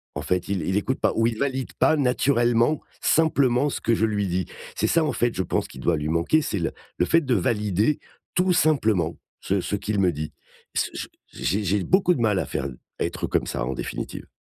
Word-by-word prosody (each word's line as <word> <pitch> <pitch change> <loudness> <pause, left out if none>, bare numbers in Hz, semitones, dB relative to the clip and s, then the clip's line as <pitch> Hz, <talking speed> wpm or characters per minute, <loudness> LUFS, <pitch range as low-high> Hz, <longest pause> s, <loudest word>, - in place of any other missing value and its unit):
En 75 - -3
fait, 90 +3 -1
il 95 -4 0
il 95 +4 0
écoute 130 +6 -1
pas» - - +3
ou 115 0 +3
«Il 115 -2 -2
valide 130 -1 -2
pas 155 - +5
naturellement, 125 0 +2 0.2
simplement, 140 -4 +3
ce - - -4
que 115 - +2
je 110 - +2
lui 105 -2 0
dis». 90 +1 -1 0.3
C'est - - +1
ça 165 -1 +3
en - - 0
fait, 120 -1 0
je 95 - 0
pense, - - -1
qui 65 - -12
doit 85 +3 +1
lui 75 0 -3
manquer, 85 - +2
c'est 100 - -2
le 85 - -1 0.3
le 90 - +2
fait 165 - +4
de 130 -4 0
valider 105 +6 +1 0.4
tout 180 0 +3
simplement 110 - +2 0.2
ce 100 0 0
ce 105 - -2
qu'il 105 0 -2
me 90 -2 +3
dit. 75 +1 -5 0.4
Pss - - 0
ch - - -5 0.2
j'ai 105 +3 -1
j'ai 95 +1 +1
beaucoup 185 -1 +3
de 120 - -2
mal 105 -4 +2
à - - -1
faire 70 - -3 0.3
à - - +1
être - - -3
comme - - 0
ça - - -2
en 65 - -2
définitive. - - -5
110 Hz, 230 wpm, -24 LUFS, 90-135 Hz, 0.4 s, pas